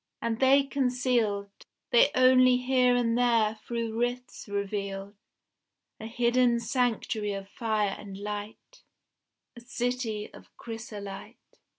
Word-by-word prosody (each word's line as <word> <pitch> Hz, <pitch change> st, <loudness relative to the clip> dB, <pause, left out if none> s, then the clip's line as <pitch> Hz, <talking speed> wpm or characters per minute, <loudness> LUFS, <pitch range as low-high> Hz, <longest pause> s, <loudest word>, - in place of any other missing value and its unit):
And 230 Hz, -1 st, -2 dB
they 270 Hz, +1 st, +5 dB
concealed 245 Hz, -7 st, 0 dB, 0.4 s
They -, -, +6 dB
only 255 Hz, 0 st, +6 dB
here 250 Hz, -1 st, +2 dB
and 235 Hz, -2 st, +1 dB
there 230 Hz, -3 st, +2 dB
through 230 Hz, -2 st, -3 dB
rifts 245 Hz, 0 st, -3 dB
revealed 200 Hz, -1 st, -4 dB, 0.9 s
A 220 Hz, -, -6 dB
hidden 240 Hz, +1 st, +2 dB
sanctuary 230 Hz, -3 st, -1 dB
of 195 Hz, 0 st, -6 dB
fire 215 Hz, -3 st, -1 dB
and 200 Hz, -2 st, -9 dB
light, 210 Hz, -, -7 dB, 0.7 s
A -, -, -10 dB
city 240 Hz, -3 st, -3 dB
of -, -, -14 dB
chrysolite. 215 Hz, -4 st, -8 dB
235 Hz, 110 wpm, -28 LUFS, 210-250 Hz, 0.9 s, They